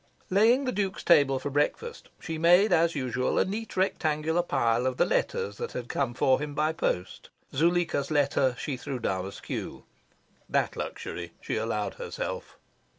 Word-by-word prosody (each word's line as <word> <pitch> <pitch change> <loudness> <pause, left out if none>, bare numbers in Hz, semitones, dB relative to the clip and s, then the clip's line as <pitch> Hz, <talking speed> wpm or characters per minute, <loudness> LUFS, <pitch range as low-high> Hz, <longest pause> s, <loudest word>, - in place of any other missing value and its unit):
Laying 230 +8 +4
the 255 - 0
Duke's 195 -2 -2
table 140 -6 +5
for 140 +2 -4
breakfast, 150 - -1
she 160 -1 -5
made 180 +6 +5
as 165 0 +3
usual 130 -2 -1
a - - +4
neat 215 +3 -5
rectangular 160 -3 +1
pile 125 -6 +1
of 130 -1 -2
the - - +4
letters 100 0 -1
that - - -5
had 125 -1 -5
come 125 -4 -1
for 130 +1 +3
him 145 0 -5
by 155 +1 +1
post. 90 - -3 0.2
Zuleika's 165 -2 +1
letter 140 -4 +2
she 140 -3 -3
threw 135 +1 -4
down 95 -5 -2
askew. 100 - -6 0.7
That - - +1
luxury - - -6
she - - -3
allowed 110 -1 -2
herself. - - -5
145 Hz, 160 wpm, -28 LUFS, 130-175 Hz, 0.7 s, table